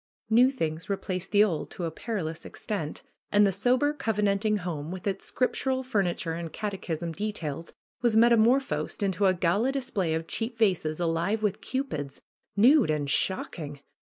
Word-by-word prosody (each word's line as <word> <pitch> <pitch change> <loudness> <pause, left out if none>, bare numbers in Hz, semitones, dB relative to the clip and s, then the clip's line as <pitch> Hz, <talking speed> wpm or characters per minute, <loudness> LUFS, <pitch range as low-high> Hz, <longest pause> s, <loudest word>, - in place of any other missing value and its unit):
New 245 +3 +6
things 165 - -3
replaced 190 -2 -3
the 205 0 +6
old 160 -8 -1
to 180 - -7
a 165 - -2
perilous 165 -4 -4
extent. 190 -9 -5 0.3
And 205 0 +6
the 195 - +3
sober, 250 +9 +2
covenanting 210 -4 +1
home, 165 -5 -4
with 185 0 -7
its 195 -1 -2
scriptural 260 +1 0
furni 200 -9 0
ture 165 - -3
and 165 -1 -5
catechism 175 -4 -4
details, 165 -5 -4 0.3
was 235 -3 +3
metamorphosed 235 +1 +3
into 195 0 +2
a 185 - +3
gala 185 +9 +2
display 205 -11 -1
of 160 0 -3
cheap 230 +6 -3
vases, 180 -8 +1
alive 170 +6 0
with 210 -3 0
cupids 155 - -4 0.4
(nude 250 - +6
and 145 -2 0
shocking!) 150 -6 -1
195 Hz, 155 wpm, -28 LUFS, 165-225 Hz, 0.4 s, New